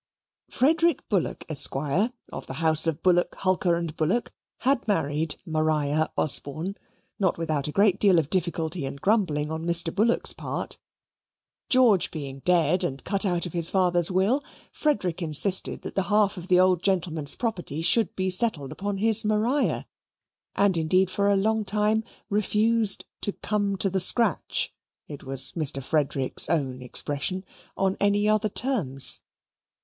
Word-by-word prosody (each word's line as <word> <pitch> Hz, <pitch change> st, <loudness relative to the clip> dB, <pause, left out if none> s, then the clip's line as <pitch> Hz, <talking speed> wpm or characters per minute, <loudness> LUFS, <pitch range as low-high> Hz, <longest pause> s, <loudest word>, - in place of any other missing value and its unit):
Frederick 325 Hz, +3 st, +1 dB
Bullock, 195 Hz, -6 st, -2 dB
Esq., 155 Hz, -4 st, +2 dB
of 185 Hz, -, -3 dB
the -, -, -6 dB
house 160 Hz, 0 st, +2 dB
of 165 Hz, 0 st, -3 dB
Bullock, 175 Hz, -1 st, +2 dB
Hulker, 185 Hz, -2 st, +1 dB
and 170 Hz, -2 st, -4 dB
Bullock, 180 Hz, +11 st, -1 dB, 0.3 s
had 260 Hz, -2 st, 0 dB
married 155 Hz, -5 st, -1 dB
Maria 155 Hz, -2 st, 0 dB
Osborne, 155 Hz, +6 st, 0 dB, 0.4 s
not 190 Hz, -4 st, 0 dB
without 155 Hz, -4 st, -2 dB
a -, -, -4 dB
great 195 Hz, +2 st, +2 dB
deal 195 Hz, -4 st, +4 dB
of 160 Hz, -1 st, -1 dB
difficulty 170 Hz, -4 st, -1 dB
and 140 Hz, -, -8 dB
grumbling 160 Hz, -7 st, 0 dB
on 160 Hz, 0 st, -5 dB
Mr. 170 Hz, -1 st, +2 dB
Bullock's 220 Hz, +4 st, +1 dB
part. -, -, -5 dB, 0.9 s
George 245 Hz, -8 st, +4 dB
being 140 Hz, -4 st, -7 dB
dead 175 Hz, +2 st, +1 dB
and 135 Hz, -6 st, -4 dB
cut 200 Hz, 0 st, +1 dB
out 175 Hz, -1 st, 0 dB
of 175 Hz, -, -7 dB
his 170 Hz, -2 st, +4 dB
father's 175 Hz, -3 st, +1 dB
will, 195 Hz, +10 st, +1 dB, 0.3 s
Frederick 190 Hz, -, -1 dB
insisted 170 Hz, +4 st, +1 dB
that -, -, -7 dB
the 195 Hz, -, 0 dB
half 210 Hz, -1 st, +2 dB
of 180 Hz, -1 st, -9 dB
the 180 Hz, -1 st, +4 dB
old 185 Hz, -2 st, +3 dB
gentleman's 170 Hz, -7 st, +1 dB
property 175 Hz, -, -4 dB
should 185 Hz, +3 st, +2 dB
be 185 Hz, 0 st, -2 dB
settled 180 Hz, -, 0 dB
upon 200 Hz, 0 st, -4 dB
his 220 Hz, +2 st, +4 dB
Maria, 215 Hz, +7 st, 0 dB, 0.7 s
and 200 Hz, -3 st, +2 dB
indeed, 185 Hz, +4 st, +1 dB
for 200 Hz, +1 st, 0 dB
a 200 Hz, -, +3 dB
long 220 Hz, +2 st, 0 dB
time, 210 Hz, +2 st, 0 dB, 0.2 s
refused, 215 Hz, +1 st, +1 dB, 0.2 s
"to 205 Hz, -, -1 dB
come 205 Hz, -2 st, -2 dB
to 195 Hz, -, +1 dB
the 190 Hz, 0 st, -1 dB
scratch" 210 Hz, +1 st, +2 dB, 0.3 s
(it 145 Hz, -2 st, -10 dB
was 135 Hz, 0 st, +3 dB
Mr. 155 Hz, -4 st, -2 dB
Frederick's 140 Hz, -3 st, 0 dB
own 135 Hz, -6 st, -2 dB
expression) 145 Hz, +8 st, 0 dB, 0.3 s
on 195 Hz, 0 st, 0 dB
any 205 Hz, +1 st, +1 dB
other 215 Hz, 0 st, +1 dB
terms. 190 Hz, -, +1 dB
185 Hz, 155 wpm, -25 LUFS, 155-205 Hz, 0.9 s, deal